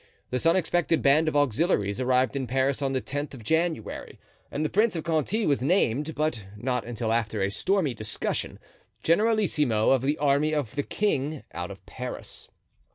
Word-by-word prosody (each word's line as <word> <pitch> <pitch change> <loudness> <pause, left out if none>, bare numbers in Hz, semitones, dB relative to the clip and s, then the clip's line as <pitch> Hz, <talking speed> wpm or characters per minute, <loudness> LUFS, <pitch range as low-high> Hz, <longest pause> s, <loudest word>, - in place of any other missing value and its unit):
This 125 +6 0
unexpected 170 -1 +2
band 150 +3 +4
of 155 - 0
auxiliaries 130 - +1
arrived 130 0 +2
in 135 -2 -2
Paris 130 +3 +1
on 135 -1 0
the 130 - 0
tenth 145 +1 -4
of 120 - -11
January 160 -2 -1 0.3
and 150 +2 -2
the - - 0
Prince 215 0 +2
of 160 - -3
Conti 170 +7 0
was 140 -3 +2
named, 150 - +1
but 150 -8 -1
not 125 +2 -1
until 115 -1 -2
after 110 -3 0
a 100 - 0
stormy 180 - +1
discussion, 110 -1 -3 0.5
generalissimo 165 - +2
of 135 -2 +4
the 145 +3 0
army 145 +2 +2
of 140 -8 -2
the 145 - 0
king, 150 -5 -1
out 90 +2 -4
of 95 -2 -11
Paris. 125 +4 -7
140 Hz, 170 wpm, -27 LUFS, 120-160 Hz, 0.5 s, band